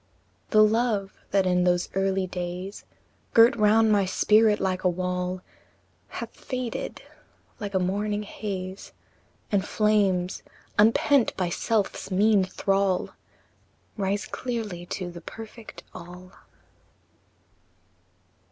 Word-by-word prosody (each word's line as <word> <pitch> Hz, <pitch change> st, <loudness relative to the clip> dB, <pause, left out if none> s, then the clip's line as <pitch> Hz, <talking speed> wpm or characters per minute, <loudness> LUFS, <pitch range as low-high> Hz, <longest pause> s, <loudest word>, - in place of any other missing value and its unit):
VI. -, -, -39 dB
The 215 Hz, -, +9 dB
love, 215 Hz, -3 st, +1 dB, 0.2 s
that 195 Hz, -1 st, +2 dB
in 180 Hz, -1 st, +2 dB
those 175 Hz, 0 st, +2 dB
early 195 Hz, 0 st, +1 dB
days 180 Hz, +2 st, -6 dB, 0.5 s
Girt 230 Hz, +4 st, +7 dB
round 220 Hz, 0 st, +4 dB
my 205 Hz, -1 st, +4 dB
spirit 210 Hz, +3 st, +4 dB
like 185 Hz, -1 st, -1 dB
a 180 Hz, -, +4 dB
wall, 180 Hz, +1 st, -2 dB, 0.6 s
Hath 230 Hz, -, -6 dB
faded 255 Hz, -2 st, -5 dB, 0.6 s
like 205 Hz, -2 st, -5 dB
a -, -, +4 dB
morning 205 Hz, +3 st, -1 dB
haze, 195 Hz, -2 st, -6 dB, 0.6 s
And 200 Hz, -2 st, +2 dB
flames, 200 Hz, -4 st, +1 dB, 0.4 s
unpent 230 Hz, +4 st, +4 dB
by 180 Hz, -2 st, 0 dB
self's 210 Hz, +3 st, -1 dB
mean 205 Hz, +1 st, +4 dB
thrall, 195 Hz, 0 st, 0 dB, 0.8 s
Rise 200 Hz, 0 st, -1 dB
clearly 215 Hz, -8 st, -5 dB
to 180 Hz, -1 st, -4 dB
the 170 Hz, 0 st, -10 dB
perfect 225 Hz, +4 st, -10 dB
|ALL|. 180 Hz, +2 st, -11 dB
195 Hz, 110 wpm, -26 LUFS, 185-215 Hz, 0.8 s, The